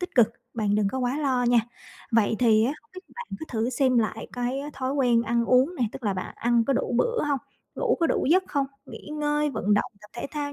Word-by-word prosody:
tích 360 - -5
cực, 240 -4 +6 0.3
bạn 210 -3 0
đừng 210 -1 +2
có 260 - -3
quá 255 +3 -1
lo 260 -4 +1
nha. 240 -1 +5 0.5
Vậy 220 -1 +3
thì 220 -2 +4
á, 260 - +1
hông 300 - -33
biết 370 - -8 0.2
bạn 485 0 -6
có 315 - -6
thử 230 +1 -1
xem 255 -1 +2
lại 220 0 -1
cái, 245 +2 -2
a, 295 +1 -6
thói 260 0 -3
quen 245 -4 +3
ăn 235 +1 +1
uống 255 +8 +3
nè, 255 - -2
tức 265 - -9
là 200 -2 +1
bạn 185 - -5
ăn 235 -1 +2
có 275 - +1
đủ 250 - -1
bữa 475 0 +1
hông? 280 - +1 0.4
Ngủ 480 -2 +1
có 330 - +4
đủ - - 0
giấc 370 +2 +4
không? 280 -2 0 0.2
Nghỉ - - -10
ngơi, 295 0 0
vận 205 -6 +1
động, - - 0
tập 210 - -15
thể - - -4
thao 290 -1 -3
255 Hz, 255 wpm, -26 LUFS, 230-295 Hz, 0.5 s, cực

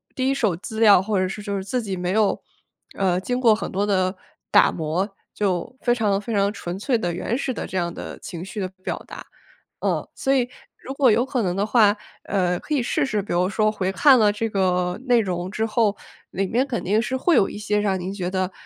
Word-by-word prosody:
第 260 0 0
1 - - +2
手 215 -10 +1
资 220 +5 -7
料， 205 -5 +7
或 200 0 0
者 185 - +1
是 210 +3 -6
就 200 -1 -2
是 190 - -5
自 245 +5 -1
己 195 -4 -4
没 180 0 -2
有， 215 -1 +2 0.6
呃， 185 -2 +2
经 245 +6 -2
过 230 -3 +6
很 215 - -3
多 200 +2 -1
的 185 -2 +1 0.3
打 - - +5
磨， 175 +6 -2 0.2
就 200 +3 -1
非 240 - +3
常 205 -4 +1
非 230 +2 -5
常 200 0 +2
纯 185 -2 -6
粹 240 +4 +1
的、 175 -6 -2
原 225 +7 -2
始 265 - -2
的 - - -5
这 190 - -4
样 170 -1 -1
的 - - -7
情 170 0 -7
绪 205 +2 -6
的 185 - -2
表 - - -4
达。 - - -10 0.6
嗯， - - -1
所 270 - 0
以 250 -2 +1 0.3
如 270 - -7
果 275 -3 +4
有 235 +4 +2
可 255 -3 -1
能 180 -3 0
的 200 +2 0
话， 215 -3 +5 0.3
呃， 180 -3 0
可 305 - -4
以 270 - +1
试 290 +5 0
试 215 -6 -1
比 200 - -4
如 180 +2 +2
说 215 +1 +2
回 190 -3 -2
看 270 +5 +6
了 210 -2 +4
这 225 +2 -2
个 180 -3 0
内 245 -2 +4
容 180 -3 -3
之 220 +2 -1
后， 215 -2 +2 0.4
里 195 +2 -1
面 245 +7 +1
肯 245 -4 -3
定 210 +4 +1
是 250 - -3
会 340 +3 +3
有 195 - +3
一 - - -7
些 210 0 0
让 195 -3 0
您 180 +2 -4
觉 180 -2 -3
得， 185 -1 -1
205 Hz, 255 characters per minute, -23 LUFS, 185-230 Hz, 0.6 s, 料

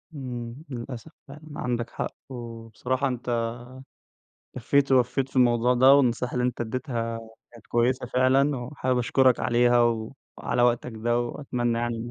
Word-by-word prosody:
امم، 120 -3 -6
للأسف 125 +4 -7 0.2
فعلًا 140 +2 -11 0.2
عندك 120 -1 -2
حق، - - -4 0.2
وبصراحة 120 +2 -4
أنت 120 -2 -2 1.1
كفّيت 135 +3 +2
ووفّيت 130 +1 +2
في 135 - -12
الموضوع 125 0 +4
ده، 130 +3 +7
والنصيحة 125 -2 +2
اللي 125 0 0
أنت 125 -1 -2
اديتها 115 -1 -3 0.3
كانت 115 -2 -16
كويسة 125 +2 +1
فعلًا، 130 +3 +2
وحابب 125 0 -2
أشكرك 130 +1 +3
عليها 120 0 +3 0.6
وعلى 120 - 0
وقتك 120 0 +1
ده 120 +2 0
وأتمنى 120 -2 -2
يعني 120 0 -2
إن 120 +1 -6
125 Hz, 140 wpm, -26 LUFS, 120-130 Hz, 1.1 s, ده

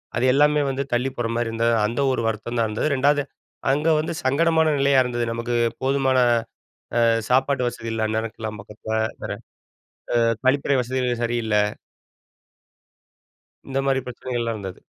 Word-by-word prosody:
அது - - 0
எல்லாமே 150 +2 +4
வந்து 135 +1 -1
தள்ளிப் 130 +2 0
போற 120 -1 -1
மாரி 120 0 0
இருந்தது. 115 +1 +1
அந்த 115 +6 -2
ஒரு 130 - 0
வருத்தம் 115 +2 -3
தான் 115 - +2
இருந்தது. 110 +7 -1
2ஆவது 145 +2 +3 0.5
அங்க 150 +4 0
வந்து 155 - -2
சங்கடமான 160 +4 +3
நிலையா 140 -1 +4
இருந்தது. 120 -1 -2
நமக்கு 115 +1 -2 0.3
போதுமான 135 -1 +2 0.9
ஆ - - +5 0.3
சாப்பாடு 130 0 +2
வசதி 115 -1 -6
இல்ல, 110 -1 0
அந்நேரம் 110 0 -2
கிளம்பாக்காத்துல, 110 +1 -4 0.8
ஆ - - +3 0.3
கழிப்பறை 140 +1 +3
வசதிகள் 125 -1 -1
சரியில்ல. 115 -2 -1 2.1
இந்த 135 0 -1
மாரி 135 -1 +2
பிரச்சனைகள்லாம் 120 -2 -3
இருந்தது. 95 -2 -7
120 Hz, 135 wpm, -23 LUFS, 115-135 Hz, 2.1 s, ஆ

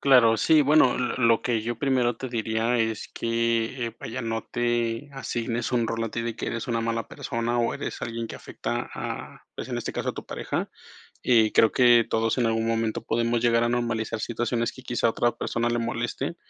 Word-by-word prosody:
Claro 125 -5 +6
sí, 155 +6 +5
bueno, 145 -3 +5
l 125 -1 -1
lo 115 -2 +4
que 115 -3 0
yo 120 0 -3
primero 130 -4 +2
te 130 - -5
diría 115 +1 0
es 110 -2 -1
que, 115 +1 0
eh, 115 - -7
vaya, 120 +4 -5
no 115 -2 -2
te 120 +2 -1
asignes 120 -2 -3
un 120 -2 +2
rol 115 0 -2
a 115 - -4
ti 115 - -3
de 115 -1 -3
que - - -4
eres 115 +1 -3
una 115 -1 0
mala 115 0 -2
persona, 115 +1 -2
o 120 -1 +1
eres - - -5
alguien 115 0 -3
que - - -8
afecta, - - -4
ah, - - -6
pues, - - -6
en - - -1
este - - -4
caso - - -1
a - - -10
tu - - -8
pareja. - - -3 0.5
Eh, 115 -3 +4
creo 110 - +5
que 120 -2 +6
todos 115 +2 +1
en 125 - +2
algún 115 0 +1
momento 115 -1 0
podemos 115 +1 0
llegar 115 0 +3
a 120 - +1
normalizar 115 -2 -1
situaciones 120 +1 -1
que 130 - -12
quizá 120 -2 0
a - - +3
otra 120 +1 +1
persona 120 0 -1
le 120 - 0
moleste 115 0 -2
115 Hz, 215 wpm, -26 LUFS, 115-120 Hz, 0.5 s, Claro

